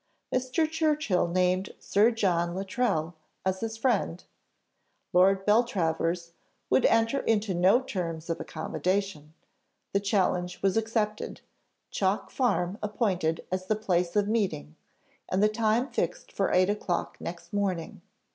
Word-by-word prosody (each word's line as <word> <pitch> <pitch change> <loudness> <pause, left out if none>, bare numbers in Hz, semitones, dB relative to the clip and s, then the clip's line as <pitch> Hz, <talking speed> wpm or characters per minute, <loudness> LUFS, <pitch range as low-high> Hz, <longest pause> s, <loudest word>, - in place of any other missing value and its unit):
Mr. 255 +5 +1
Churchill 305 - +1
named 185 +2 0
Sir 210 +3 +3
John 175 -7 0
Luttrell 190 -4 -1 0.3
as 190 0 0
his 225 +1 -4
friend: 225 -8 0 0.9
Lord 190 +2 +4
Beltravers 175 -6 +1 0.4
would 265 - +5
enter 230 +4 +2
into 215 -3 +1
no 185 +7 +5
terms 165 -8 -4
of 165 -1 -2
accommodation; 185 -5 -3 0.6
the 200 - +3
challenge 185 -3 0
was 195 -1 +2
accepted, 220 -1 -1 0.5
Chalk 195 +1 0
Farm 205 -6 0
appointed 190 -7 -1
as 185 0 -2
the 215 - +2
place 180 -4 0
of 205 -1 +3
meeting, 195 - -1 0.5
and 190 +2 +1
the - - +7
time 225 +3 +1
fixed - - -3
for - - 0
eight 185 +2 +4
o'clock 200 -4 -2
next 170 +1 -8
morning. 190 -5 -2
195 Hz, 130 wpm, -28 LUFS, 180-220 Hz, 0.9 s, the